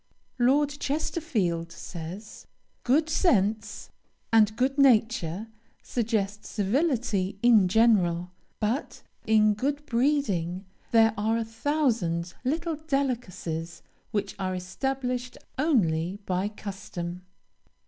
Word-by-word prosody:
Lord 280 +4 +3
Chesterfield 250 - -1
says, 175 +5 -8 0.4
"Good 295 +6 +3
sense 215 - +1 0.4
and 215 -1 +5
good 265 +4 0
nature 225 - +3 0.3
suggest 215 -3 -1
civility 215 - 0
in 225 -6 +6
general; 180 -5 +3 0.3
but 225 +7 -2 0.2
in 215 -1 +5
good 285 +7 -2
breeding 220 - 0 0.2
there 225 -1 +5
are 220 +2 +1
a 230 - -1
thousand 225 - 0
little 320 +4 -1
delicacies 235 - -3 0.3
which 210 -3 -2
are 185 -1 -1
established 250 +6 -3 0.2
only 185 - +1
by 185 +2 0
custom." 185 -4 -6
220 Hz, 95 wpm, -27 LUFS, 185-265 Hz, 0.4 s, in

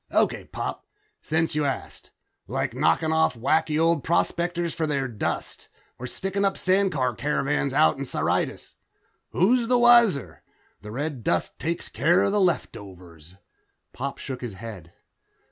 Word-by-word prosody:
"Okay, - - +1
Pop, - - -5 0.3
since 160 +1 0
you 150 0 +1
ask. 140 -2 -4 0.4
Like - - -2
knocking 120 - +2
off 160 -5 +2
wacky 155 +5 +1
old 165 -3 +2
prospectors 170 0 0
for 160 - -2
their 140 -3 -1
dust. 115 -4 -4 0.3
Or 125 - -5
sticking 195 +7 -2
up 195 -1 +2
sandcar 185 - +1
caravans 145 +1 0
out 150 0 +3
in 140 - -3
Syrtis. - - -2 0.6
Who's 235 +6 +2
the 250 +1 +4
wiser? 235 - +4 0.4
The 105 - -9
red 135 +1 -4
dust 85 -3 -1
takes 170 +1 -2
care 175 +3 +2
of 195 - +1
the 205 0 +2
leftovers." 90 - -4 0.6
Pop 140 +2 -4
shook 130 -2 -6
his 120 -4 -5
head. 95 -5 -9
150 Hz, 145 wpm, -25 LUFS, 125-175 Hz, 0.6 s, the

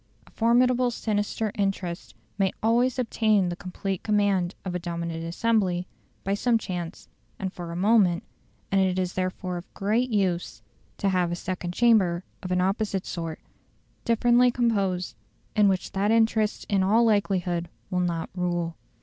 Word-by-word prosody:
A - - -20
formidable 245 +2 +3
sinister 215 -1 -1
interest 195 -3 -3 0.2
may 195 -2 +1
always 240 +3 +3
obtain 215 -6 +2
the 175 - -3
complete 190 +1 -4
command 200 -4 +1
of 185 - -3
a 180 - -1
dominant 170 -1 -4
assembly 180 0 0 0.4
by 195 - 0
some 230 +3 +2
chance 180 -4 -6 0.3
and 190 -1 -4
for 175 -2 -7
a - - -5
moment, 190 -2 +3 0.5
and 195 0 +4
it 185 -1 +1
is 185 -1 -1
therefore 185 0 -3
of 175 - -10
great 220 +6 +1
use 190 -6 -1 0.3
to 200 - +1
have 180 -2 +1
a - - -1
second 180 -1 -4
chamber 195 -7 +3 0.2
of 185 -2 -5
an 180 0 +2
opposite 195 0 0
sort, 165 -2 -5 0.6
differently 240 +1 +4
composed, 200 -7 0 0.4
in 210 -1 +5
which 190 -2 0
that 200 +2 0
interest 220 -1 +2
in 200 -2 +2
all 220 +5 +4
likelihood 185 -5 +1 0.2
will 180 - +1
not 170 -2 -1
rule. 175 -2 -2
195 Hz, 155 wpm, -26 LUFS, 180-220 Hz, 0.6 s, in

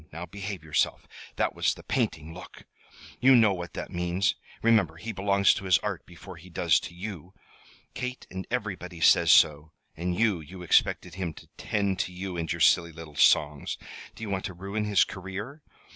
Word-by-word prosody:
Now 85 +3 -6
behave 100 0 -6
yourself. 75 -1 0 0.3
That - - 0
was - - +1
the - - -13
painting 80 0 -2
look! 90 +2 -12 0.6
You 130 +1 +6
know 110 -4 +5
what 90 -2 -6
that - - -6
means. 90 +2 0 0.3
Remember, 115 -2 +3
he 115 - -6
belongs 100 -1 +3
to 95 - -6
his 90 -3 +5
Art 100 -5 -4
before 90 +1 -11
he 90 +3 -14
does 85 - +2
to 85 - -9
you. 95 -1 -8 0.6
Kate 125 0 -5
and 95 0 -6
everybody 95 -7 -4
says - - +5
so. 75 +1 +5 0.2
And 90 +2 -2
you 110 -6 +2
you 90 +4 -10
expected 90 0 +2
him 90 -4 -4
to - - -14
tend 100 -3 -1
to 95 - -1
you 90 0 -5
and 85 -1 -3
your - - -3
silly 85 -1 +4
little 80 -2 -11
songs. 75 0 +3 0.4
Do - - -9
you 105 - -4
want 95 -1 -2
to 95 -4 -6
ruin 100 +4 -3
his 105 -2 +4
career? 100 - -7
95 Hz, 190 wpm, -27 LUFS, 85-100 Hz, 0.6 s, You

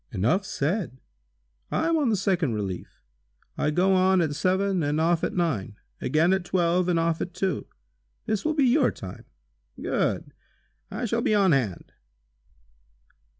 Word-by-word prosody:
"Enough 125 - +1
said. 165 - -2 0.7
I - - 0
am 335 - +2
on 295 -6 +2
the 220 - +2
second 180 - 0
relief. 95 -4 -6 0.5
I - - 0
go 180 +5 +2
on 185 0 +4
at 160 -4 +1
seven 190 +3 +1
and 150 +1 0
off 165 +1 +2
at - - -1
nine; 140 - -1 0.3
again 160 +7 +2
at 190 -1 0
twelve 180 0 +1
and 175 - +2
off 165 0 0
at 180 - -5
two. 190 -6 -2 0.6
This 215 -2 -1
will 310 0 0
be 285 -3 +3
your 260 +2 +4
time." 90 - -9 0.5
"Good! - - -1 0.6
I 220 +5 -4
shall 235 +1 0
be 215 - +2
on 195 -3 +4
hand!" 120 - -1
180 Hz, 155 wpm, -26 LUFS, 150-195 Hz, 0.7 s, on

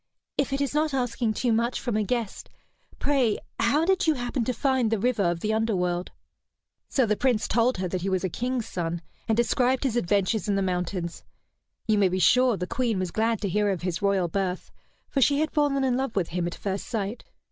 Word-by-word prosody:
"If 280 -1 0
it 275 +1 -1
is 280 -1 -1
not 305 -1 +1
asking 240 -3 -1
too 240 0 +1
much 235 +2 0
from 240 -4 -2
a 215 - +2
guest, 225 0 -3 0.5
pray 265 -7 +2 0.2
how 280 +8 +3
did 380 -1 +2
you 315 - +4
happen 245 0 -2
to 255 - +1
find 255 -1 +1
the 225 - +1
river 235 +1 +1
of 170 -2 0
the 215 0 0
underworld?" 180 -5 0 0.8
So 265 - +2
the 215 -1 +1
Prince 245 -2 +1
told 235 +1 +2
her 185 0 -1
that 180 0 -3
he 195 - -1
was 185 -1 0
a - - +1
king's 245 +5 -2
son, 170 -1 -3 0.2
and 225 -1 +1
described 250 +2 +2
his 260 -4 0
adventures 205 0 +1
in 200 - +2
the 195 - +1
mountains. 180 -1 -3 0.6
You 215 -2 +2
may 195 -2 +4
be 185 - -1
sure 250 +4 +4
the 180 - -2
Queen 235 0 -1
was 185 -2 -2
glad 225 +1 0
to 205 - 0
hear 205 +2 +1
of 185 -3 -2
his 180 0 -2
royal 200 -3 +2
birth, 185 +1 -3 0.4
for 275 - -1
she 280 +2 +4
had 310 0 0
fallen 285 -3 +1
in 255 -2 +2
love 265 -3 -2
with 185 -4 0
him 175 0 -1
at 175 - -5
first 195 -1 -4
sight. 215 -1 -3
220 Hz, 225 wpm, -26 LUFS, 190-255 Hz, 0.8 s, you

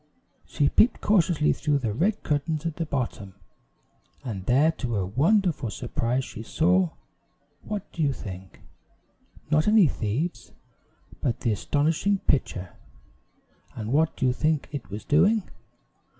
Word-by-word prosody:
She 145 - +1
peeped 230 - +3
cautiously 175 -7 +2
through 145 -1 0
the 115 -6 -2
red 195 - 0
curtains 150 +2 -1
at 165 -2 -3
the 165 - -2
bottom, 115 -9 -4 0.9
and 105 -8 -5
there, 140 +6 +4
to 125 -7 -4
her 100 -4 0
wondering 170 - +2 0.2
surprise, 120 +3 -2
she - - -8
saw, 180 +9 +2 0.7
what 210 -2 -6
do 165 - -5
you 145 -2 +3
think? 95 -7 -9 0.9
not 155 +3 +3
any 210 -3 +6
thieves, 130 +8 -3 0.7
but 120 -5 -1
the 115 - +1
astonishing 155 - +1
pitcher; 95 - -1 1.0
and 110 +2 -4
what 155 +2 +2
do - - 0
you 125 - +3
think 155 +2 0
it 140 -11 -6
was 105 +2 -7
doing? 195 +8 +3
145 Hz, 135 wpm, -26 LUFS, 115-170 Hz, 1.0 s, any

